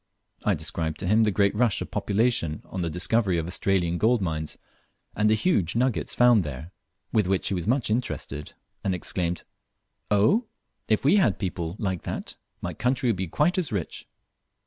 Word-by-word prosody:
I 105 - +2
described 80 0 -2
to 95 - -2
him 110 +3 +4
the - - +3
great 100 0 +2
rush 110 -1 +2
of - - -6
population 100 -7 0
on 95 - -5
the 85 - -1
discovery 90 +3 +1
of 80 - -1
the 90 - -5
Australian 90 -2 +1
gold 115 +3 +3
mines, 80 -5 -3 0.6
and 105 0 +3
the 110 - +5
huge 105 - +1
nuggets 125 -1 +1
found 120 -5 +5
there, 75 +3 -7 0.4
with 105 -4 +3
which 95 0 +1
he - - -1
was 90 0 -2
much 125 -2 +1
interested, 90 - -3 0.3
and 95 -2 0
exclaimed, 90 0 -2 0.7
"Oh? 150 - +3 0.4
if 110 +3 +1
we 165 +9 +6
had 165 - +4
but - - -22
people 85 -3 -3
like 95 -6 -2
that, - - -5 0.3
my - - -3
country 125 0 0
would 115 - +2
be 95 0 -3
quite 160 - +1
as 175 - -2
rich." 95 -7 -4
100 Hz, 190 wpm, -26 LUFS, 85-115 Hz, 0.7 s, we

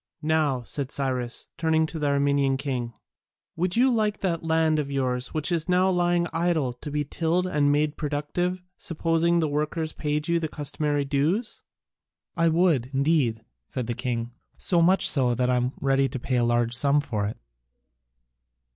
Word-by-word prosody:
"Now," 150 -5 +1
said 135 +2 -3
Cyrus, 130 -4 -2
turning 160 -1 +2
to 160 0 -6
the 150 - 0
Armenian 140 -1 +2
king, 125 -4 -3 0.6
"would 175 +2 0
you 250 +2 +4
like 215 -2 0
that 170 -4 -1
land 160 -1 +2
of 145 -2 -3
yours 130 -2 -1
which 155 +2 -3
is 170 0 0
now 185 +1 +3
lying 175 -1 +2
idle 165 -6 0
to 125 +4 -8
be 150 0 -1
tilled 165 +5 0
and 145 -5 +2
made 150 +1 +1
productive, 160 +5 -2
supposing 165 +1 +1
the 165 -2 +2
workers 155 +2 -2
paid 150 0 -2
you 170 0 +2
the 160 - -2
customary 145 -1 -1
dues?" 155 - -1 0.7
"I 165 -2 +3
would, 160 -7 +2
indeed," 135 -6 +1 0.2
said 125 -3 -4
the 120 - -2
king, 120 -1 -3 0.3
"so 175 -2 +1
much 190 +3 +3
so 125 -7 +2
that 125 +1 +1
I - - +2
am 125 +1 0
ready 135 0 +2
to 135 - -5
pay 125 +1 -1
a 120 - +2
large 120 0 +1
sum 140 +3 +4
for 110 -8 -2
it. 105 - -6
150 Hz, 175 wpm, -25 LUFS, 135-165 Hz, 0.7 s, you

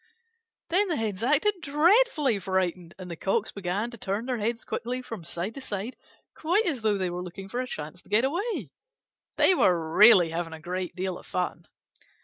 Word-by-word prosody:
Then 390 +4 +3
the 345 - 0
Hens 215 -5 -2
acted 320 - +2
dreadfully 300 - +3
frightened, 185 -2 -2
and 185 -2 -8
the - - -4
Cocks 200 +6 -1
began 200 +4 -2
to 235 - -10
turn 200 +5 -2
their 250 -2 -2
heads 230 +3 -2
quickly 250 +2 -3
from 225 -8 -7
side 175 +5 -4
to 275 - -8
side, 215 0 -5 0.4
quite 355 +8 +1
as 290 -9 -1
though 215 -2 +2
they 185 -2 -1
were 175 +1 -4
looking 180 +2 -8
for 245 +6 -2
a 255 - -4
chance 155 -2 -7
to - - -23
get 220 +5 +3
away. 335 - -2 0.7
They - - +6
were 165 - +2
really 195 -6 +8
having 165 0 -3
a 160 - -8
great 180 +2 -4
deal 185 -1 -3
of - - -16
fun. 180 0 -3
210 Hz, 195 wpm, -27 LUFS, 180-265 Hz, 0.7 s, really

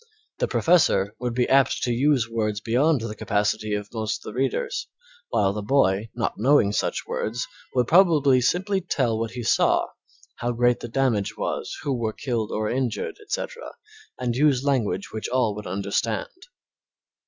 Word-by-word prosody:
The - - +1
professor 125 - +3
would 120 -1 -3
be 125 -1 +2
apt 135 0 +3
to 125 - +1
use 130 -1 +2
words 110 -2 -1
beyond 130 +6 +2
the 110 -1 -4
capacity 105 +1 0
of 105 0 -6
most 110 -1 -3
of - - -6
the - - -13
readers, 465 - -1 0.4
while 95 0 +2
the 105 - -4
boy, 105 -3 +2
not 120 -4 -2
knowing 125 -3 +4
such - - -1
words, 120 +3 -3 0.3
would 125 -1 +3
probably 155 -8 +5
simply 190 +9 +1
tell 125 -10 0
what 115 0 -2
he 125 - -5
saw, - - +3 0.5
how 120 0 -2
great 120 +1 +2
the - - -6
damage 115 -5 0
was, - - -3
who 140 -2 0
were 115 -3 -2
killed 115 -5 -3
or 110 0 -1
injured, 125 -1 -2
etc., - - -5 0.4
and 120 -2 -2
use 140 -1 +3
language 125 -8 0
which 110 - -4
all 125 -4 +1
would 105 0 -7
understand. 100 +4 -2
120 Hz, 165 wpm, -24 LUFS, 110-135 Hz, 0.5 s, probably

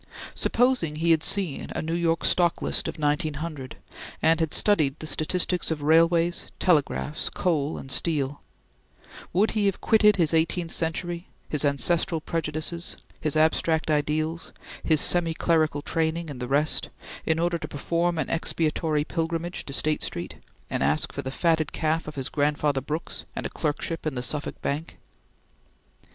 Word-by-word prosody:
Supposing 245 -11 +1
he 165 +2 +2
had 160 -1 +4
seen 185 -5 +1
a - - -1
New 160 +1 -2
York 170 -1 +1
stock 175 -2 +3
list - - 0
of 160 - -5
1900, 150 -2 -2 0.4
and 165 +1 +3
had 160 -2 0
studied 155 -9 +3
the - - -7
statistics 175 +4 0
of 155 -3 -3
railways, 165 +2 +3
telegraphs, 155 -3 +1
coal, 155 -4 -1
and 135 - -7
steel 145 -1 0 0.9
would 200 +5 +2
he 210 -2 +1
have 195 - 0
quitted 210 -2 +5
his 165 -4 +2
eighteenth 165 +1 +1
century, 170 +2 -2 0.2
his 150 -1 0
ancestral 160 +4 +1
prejudices, 160 +2 -2 0.2
his 155 -1 -1
abstract 160 0 +2
ideals, 155 +2 -1 0.3
his 155 -2 +3
semi 170 -1 +4
clerical 155 -4 +1
training, 165 0 -1
and 130 - -8
the 125 - -4
rest, 145 +4 +1 0.4
in 160 - +2
order 170 0 0
to - - -5
perform 170 +4 -1
an - - -1
expiatory 155 -2 0
pilgrimage 165 +2 -3
to - - -7
State 150 +2 0
Street, 85 - -4 0.3
and - - -3
ask 75 +3 +1
for - - -3
the 130 - -5
fatted 160 +2 +1
calf 160 0 -1
of 155 - -7
his 135 -2 -2
grandfather 145 -2 0
Brooks 155 +4 -5
and - - -4
a - - -3
clerkship 160 +1 -2
in 150 - -2
the 125 - -3
Suffolk 150 +3 -3
Bank? 150 +4 -3
160 Hz, 160 wpm, -26 LUFS, 150-170 Hz, 0.9 s, quitted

